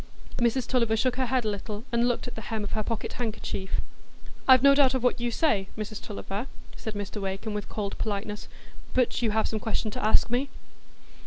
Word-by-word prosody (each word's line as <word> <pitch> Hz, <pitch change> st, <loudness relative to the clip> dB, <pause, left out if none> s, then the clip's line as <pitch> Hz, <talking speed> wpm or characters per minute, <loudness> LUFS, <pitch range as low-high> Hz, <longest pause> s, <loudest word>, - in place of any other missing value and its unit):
Mrs 240 Hz, +1 st, +2 dB
Tulliver 230 Hz, -3 st, +2 dB
shook 250 Hz, +2 st, +1 dB
her 260 Hz, -1 st, +1 dB
head 255 Hz, -1 st, +1 dB
a -, -, +2 dB
little, 205 Hz, +1 st, -4 dB
and 235 Hz, 0 st, +3 dB
looked 245 Hz, 0 st, 0 dB
at 245 Hz, -, -5 dB
the 225 Hz, -, -6 dB
hem 220 Hz, -1 st, -3 dB
of 205 Hz, -, -4 dB
her 215 Hz, -, 0 dB
pocket 220 Hz, +1 st, -3 dB
handkerchief. 215 Hz, -4 st, -3 dB, 0.7 s
"I've 260 Hz, -1 st, +8 dB
no 280 Hz, 0 st, +9 dB
doubt 275 Hz, -2 st, +5 dB
of 255 Hz, -, -1 dB
what 250 Hz, -1 st, +2 dB
you 240 Hz, -, +1 dB
say, 225 Hz, -6 st, +2 dB
Mrs 215 Hz, 0 st, -4 dB
Tulliver," 205 Hz, +3 st, -4 dB, 0.3 s
said 220 Hz, -1 st, -5 dB
Mr 205 Hz, +1 st, -4 dB
Wakem, 195 Hz, +3 st, -3 dB
with 210 Hz, -1 st, -4 dB
cold 205 Hz, -2 st, -3 dB
politeness. 210 Hz, 0 st, -3 dB, 0.5 s
"But 250 Hz, -1 st, +2 dB
you 230 Hz, -, +2 dB
have 220 Hz, +1 st, +2 dB
some 220 Hz, -, -2 dB
question 220 Hz, 0 st, -1 dB
to -, -, -4 dB
ask 220 Hz, +2 st, +4 dB
me?" 260 Hz, +3 st, +1 dB
225 Hz, 210 wpm, -28 LUFS, 210-245 Hz, 0.7 s, no